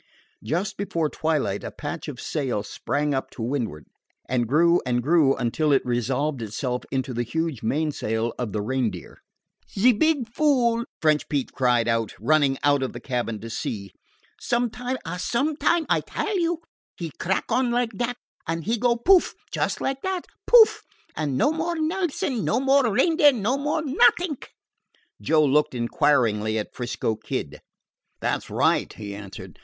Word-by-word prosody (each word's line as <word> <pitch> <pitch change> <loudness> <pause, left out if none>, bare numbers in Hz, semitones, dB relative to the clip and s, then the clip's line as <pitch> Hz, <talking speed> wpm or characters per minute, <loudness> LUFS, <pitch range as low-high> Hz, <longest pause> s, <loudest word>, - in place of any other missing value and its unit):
Just 190 +7 -2
before 165 -6 -1
twilight 150 -11 -1
a - - -4
patch - - -6
of - - -6
sail 125 -8 -2
sprang 145 +6 -2
up 135 - -2
to 115 - -7
windward, 115 - -3 0.4
and 120 -2 0
grew 170 +6 +4
and 120 -1 0
grew 150 -2 +4
until 145 +6 0
it 140 - +3
resolved 125 +3 -1
itself 125 +4 -3
into 130 -1 -2
the 120 - -1
huge 160 +2 -2
mainsail 115 -4 -1
of 120 -4 -2
the 105 0 -2
Reindeer. 115 -7 -3 0.6
"Ze 240 +6 +6
beeg 290 0 +1
fool!" 235 -3 +2
French 155 -1 +2
Pete 140 -3 -1
cried, 125 -3 +2 0.3
running 140 +3 +3
out 145 -1 +3
of 130 - -2
the 120 - -7
cabin 120 -3 -3
to 115 - -7
see. 100 -3 -4 0.5
"Sometime 245 +1 -1
ah, 165 +2 -4
sometime, 305 - +1
I - - +3
tell 425 - -3
you 335 -1 -1 0.3
he 165 -3 -5
crack 190 +6 -1
on 250 +2 +2
like 240 -1 0
dat, 240 +3 -2 0.3
an' 165 0 -2
he 230 +5 -1
go, 240 0 +3
pouf! 355 +10 +4 0.2
just - - -1
like 270 0 -2
dat, 375 -2 -2 0.2
pouf! 465 -2 +7 0.3
an' 145 -4 -1
no 290 - +3
more 335 +2 -2
Nelson, 315 - -1
no - - +1
more 270 -2 +3
Reindeer, 295 - +5
no 235 +2 0
more 295 +3 -1
nothing." 285 +4 +3 0.8
Joe 155 -1 +3
looked 145 -1 +2
inquiringly 115 -3 +1
at 105 - -4
'Frisco 120 -3 -2
Kid. 105 - -5 0.6
"That - - -1
's - - -14
right," - - +1
he 100 -2 -7
answered. 100 -1 -10
155 Hz, 160 wpm, -24 LUFS, -, 0.8 s, pouf